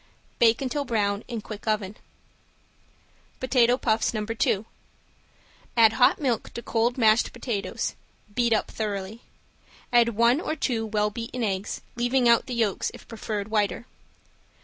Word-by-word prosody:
Bake 230 +2 +4
until 285 +2 -1
brown 210 -4 0
in 235 -3 -4
quick 215 0 -9
oven. 210 -2 -1 1.4
~POTATO 250 -1 +3
PUFFS~ 225 -2 0
~No. 215 -1 -2
2~ 220 -2 0 1.1
Add 225 -1 +6
hot 250 +4 +4
milk 255 -7 -1
to 235 - -5
cold 235 +3 0
mashed 220 -1 +4
potato 235 -4 -4 0.6
beat 235 +1 +1
up 220 - +1
thoroughly. 210 0 -4 0.7
Add 235 -2 +4
one 235 +6 +4
or 310 - -2
two 230 -6 -1
well 210 -1 0
beaten 230 +2 -5
eggs, 195 -1 -2
leaving 245 +1 +2
out 235 +2 +4
the 250 - -4
yolks 220 -5 0
if - - -14
preferred 215 -2 -4
whiter. 210 0 0
230 Hz, 140 wpm, -26 LUFS, 215-240 Hz, 1.4 s, Add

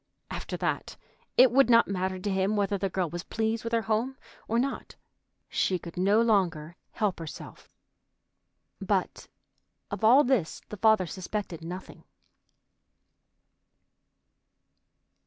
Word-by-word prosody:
After - - -5
that - - -3 0.4
it 255 -1 +7
would 270 -1 +4
not 230 -1 +6
matter 185 -1 -2
to 195 +2 -3
him 190 +2 +1
whether 200 -1 +1
the 195 0 -1
girl 185 -1 -1
was 175 +2 -5
pleased 225 0 -2
with 230 - -4
her 230 -1 +1
home 230 +5 -1 0.3
or 230 - 0
not. 270 +3 -2 0.5
She 185 - 0
could 170 -1 -10
no 200 +5 +3
longer 175 -8 +1 0.2
help 205 -5 -1
herself. 165 -2 -9 1.1
But - - -1 0.6
of - - -5
all 250 +7 +7
this 245 - 0
the 210 - -7
father 220 -2 +4
suspected 185 -1 -5
nothing. 180 +3 -8
205 Hz, 125 wpm, -28 LUFS, 185-230 Hz, 1.1 s, it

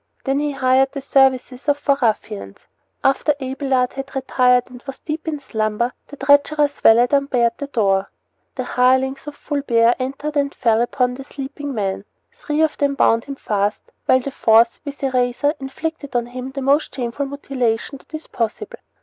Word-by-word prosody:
Then 270 0 +1
he 295 -1 -1
hired 265 0 +2
the 280 - -4
services 265 0 +1
of 290 - +3
four 285 -1 +2
ruffians. 100 - -2 0.4
After 275 +2 +2
Abelard 265 -1 -1
had 270 0 -7
retired 250 -2 +3
and 245 -1 -11
was 270 - -6
deep 310 +1 -6
in 305 -2 -2
slumber 220 -1 -1
the 285 - -11
treacherous 285 +1 +3
valet 235 +2 +6
unbarred 255 -5 +1
the 285 - -4
door. 200 -7 +1 0.5
The 255 - -3
hirelings 260 +3 +1
of 295 - -6
Fulbert 245 -6 +1
entered 275 +4 -4
and 280 0 0
fell 225 -1 +2
upon 250 +1 0
the 270 +2 -8
sleeping 280 0 -6
man. 195 -1 -2 0.3
Three 315 -11 -2
of 315 - 0
them 280 -1 +1
bound 230 -3 +3
him 280 - -6
fast, 205 -4 -2 0.2
while 260 0 +5
the 275 - -5
fourth, 230 -1 +4
with 285 -1 -8
a 270 - +1
razor, 250 +3 +1
inflicted 285 0 -5
on 240 -1 +1
him 250 +2 -7
the 270 0 -5
most 280 +3 +2
shameful 255 +2 -3
mutilation 270 -2 -2
that - - -25
is 310 - -7
possible. 420 - -4
265 Hz, 175 wpm, -20 LUFS, 245-285 Hz, 0.5 s, valet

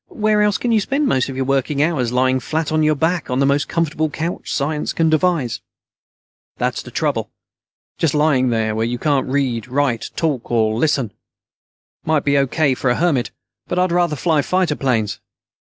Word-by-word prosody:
Where 215 -1 +1
else 210 -1 +2
can 240 - -1
you 225 - +4
spend 275 +8 0
most 130 - +1
of 135 - -6
your 130 0 -1
working 140 +2 +1
hours 140 -8 0
lying 130 +1 +2
flat 155 +5 -2
on 155 0 +2
your 155 0 +3
back 160 +3 -1
on 125 - -1
the 140 - +3
most 140 +1 +1
comfortable 160 -1 0
couch 165 +4 -4
science 150 +2 -1
can 160 -1 +1
devise?" 155 -7 +1 1.0
"That's - - -1
the - - -11
trouble. - - -1 0.7
Just 155 -3 +1
lying 145 -4 +3
there, 110 -2 0
where 110 +1 -1
you 120 +1 -2
can't 140 0 0
read, 130 -4 -1
write, 130 -3 -1
talk, 145 -7 -1
or 110 -2 +2
listen. 125 -3 0
It - - -41 0.9
might 155 -2 +1
be 140 0 +2
O.K. 140 +1 +2
for 130 0 -1
a 125 - +2
hermit, 150 -7 +1 0.4
but 180 - -3
I'd 180 -1 +2
rather 175 -3 +1
fly 155 0 +1
fighter 185 -1 0
planes. 115 -7 -1
145 Hz, 190 wpm, -19 LUFS, 130-165 Hz, 1.0 s, you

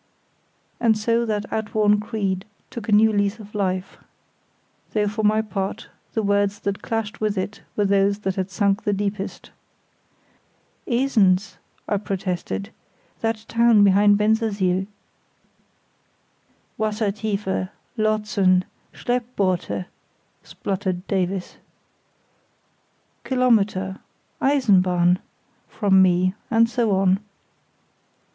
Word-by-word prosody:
And 225 -2 +3
so 230 +2 +1
that 210 -1 -1
outworn 210 -1 +2
creed 200 -3 -2 0.3
took 230 -2 -7
a - - +1
new 215 +1 +5
lease 205 +1 +1
of 210 -2 -13
life; 185 -2 -2 1.0
though 210 -1 +1
for 210 +2 -2
my 215 +1 +3
part 200 0 -4 0.3
the 220 - +1
words 200 0 +1
that 200 -1 -3
clashed 225 -2 -3
with 210 -2 0
it 190 +3 -4
were 205 - +1
those 200 0 +2
that 190 -2 -1
had 190 0 -3
sunk 200 +1 +1
the 205 - +1
deepest. 200 0 -4 1.4
"Esens," 220 -6 +2 0.3
I 205 - +1
protested; 180 - -4 0.5
"that 225 -1 -2
town 230 -2 +4
behind 205 +1 +5
Bensersiel." 205 -4 +1 1.9
"Wassertiefe, 210 -3 -1 0.3
Lotsen, 210 -4 +2 0.3
Schleppboote," 195 - -1 0.6
spluttered 190 -2 -4
Davies. 190 -1 -2 1.7
"Kilometre—Eisenbahn," 195 -4 +1 0.5
from 195 -3 +3
me, 185 0 +3 0.2
and 230 0 +4
so 235 -1 0
on. 190 -1 +3
205 Hz, 95 wpm, -23 LUFS, 190-220 Hz, 1.9 s, new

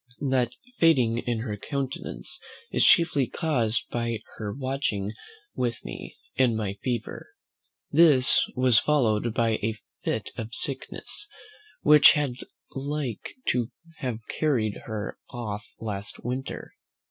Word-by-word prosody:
That 125 -2 +2 0.3
fading 125 -9 +4
in 120 -2 -2
her 110 -3 -3
countenance 140 +5 -5 0.3
is - - +3
chiefly 160 -7 +5
caused 125 -9 0
by 115 -1 -1 0.2
her 105 -2 -4
watching 130 -5 -2 0.4
with 120 -3 -2
me, - - -8 0.2
in 125 -3 +3
my 105 -3 -2
fever. 120 -3 -3 0.6
This 145 -5 +6
was 125 -2 +6
followed 120 -6 +2
by 115 -2 +2
a 110 +1 -1 0.3
fit - - -2
of 115 +1 -5
sickness, 140 - -1 0.5
which 150 -1 +8
had 145 -4 0 0.4
like 140 -3 -4
to 120 -2 +1 0.3
have 125 -6 -3
carried 120 -9 0
her 110 -2 -5
off 110 -4 -5
last 105 -2 -5
winter. 130 +2 -4
120 Hz, 120 wpm, -26 LUFS, 110-140 Hz, 0.6 s, which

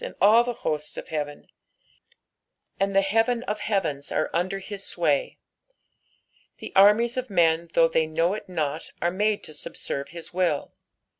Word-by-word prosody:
snd - - -6
all 220 +4 +6
the 245 0 -3
hosts 150 -1 -2
of - - -7
heaven; 145 -2 -4 1.3
and 195 0 0
the 195 - +5
heaven 225 +4 +1
of 210 -3 -3
heavens 190 -10 -2
are 155 - 0
under 185 +3 0
his 195 0 -8
sway. 155 -7 0 1.2
The - - -9
nrmies 215 +5 +5
of 255 -1 -3
men 170 -3 +2
though 165 - +5
they 160 -1 +1
know 165 +3 +1
it 205 -2 -7
not 155 -3 -3
are 175 - +1
made 210 +3 0
to - - -8
subeerve 140 -2 -4
his 170 0 -8
will. 175 -5 0
185 Hz, 160 wpm, -25 LUFS, 160-210 Hz, 1.3 s, all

